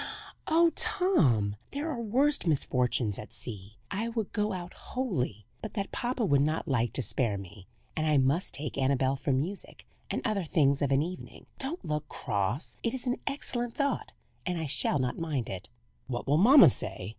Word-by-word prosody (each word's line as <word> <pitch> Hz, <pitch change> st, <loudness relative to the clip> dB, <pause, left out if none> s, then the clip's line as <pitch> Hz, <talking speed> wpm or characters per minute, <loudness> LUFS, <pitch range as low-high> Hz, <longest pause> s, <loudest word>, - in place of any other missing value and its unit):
"Oh, 335 Hz, +1 st, +5 dB
Tom! 125 Hz, -, +2 dB
there 300 Hz, +3 st, -3 dB
are 245 Hz, -5 st, -3 dB
worse 260 Hz, +2 st, +2 dB
misfortunes 125 Hz, -7 st, +1 dB
at 105 Hz, -, -9 dB
sea. 105 Hz, -2 st, -7 dB
I 205 Hz, +3 st, -1 dB
would 225 Hz, -3 st, -3 dB
go 210 Hz, 0 st, 0 dB
out 180 Hz, -2 st, -5 dB
wholly, 145 Hz, -, -3 dB, 0.2 s
but 220 Hz, -, -7 dB
that 200 Hz, -2 st, -3 dB
papa 245 Hz, -1 st, -1 dB
would 140 Hz, -7 st, +4 dB
not 155 Hz, +3 st, 0 dB
like 120 Hz, -5 st, +1 dB
to 130 Hz, -, -1 dB
spare 110 Hz, -1 st, 0 dB
me, 100 Hz, 0 st, -11 dB, 0.3 s
and 155 Hz, -1 st, 0 dB
I 150 Hz, -1 st, +4 dB
must 140 Hz, +7 st, +2 dB
take 145 Hz, -1 st, -4 dB
Annabel 135 Hz, 0 st, +2 dB
for 140 Hz, -, -2 dB
music 160 Hz, +10 st, -2 dB, 0.2 s
and -, -, -2 dB
other 215 Hz, -5 st, 0 dB
things 145 Hz, -4 st, +2 dB
of 140 Hz, -, +2 dB
an 135 Hz, +2 st, +4 dB
evening. 180 Hz, +2 st, -8 dB
Don't 275 Hz, -, -3 dB
look 150 Hz, -1 st, -2 dB
cross. 100 Hz, -, -2 dB
It 230 Hz, -, -1 dB
is 260 Hz, -, -3 dB
an 245 Hz, 0 st, 0 dB
excellent 245 Hz, -4 st, -2 dB
thought; 280 Hz, -1 st, -1 dB, 0.3 s
and 180 Hz, -2 st, -2 dB
I 160 Hz, -, -2 dB
shall 145 Hz, -, +1 dB
not 130 Hz, +2 st, -1 dB
mind 150 Hz, -8 st, -2 dB
it." 95 Hz, 0 st, -7 dB, 0.4 s
"What 120 Hz, -2 st, -3 dB
will 145 Hz, +2 st, +3 dB
mamma 235 Hz, -, +9 dB
say?" 95 Hz, -3 st, -1 dB
155 Hz, 185 wpm, -29 LUFS, -, 0.4 s, mamma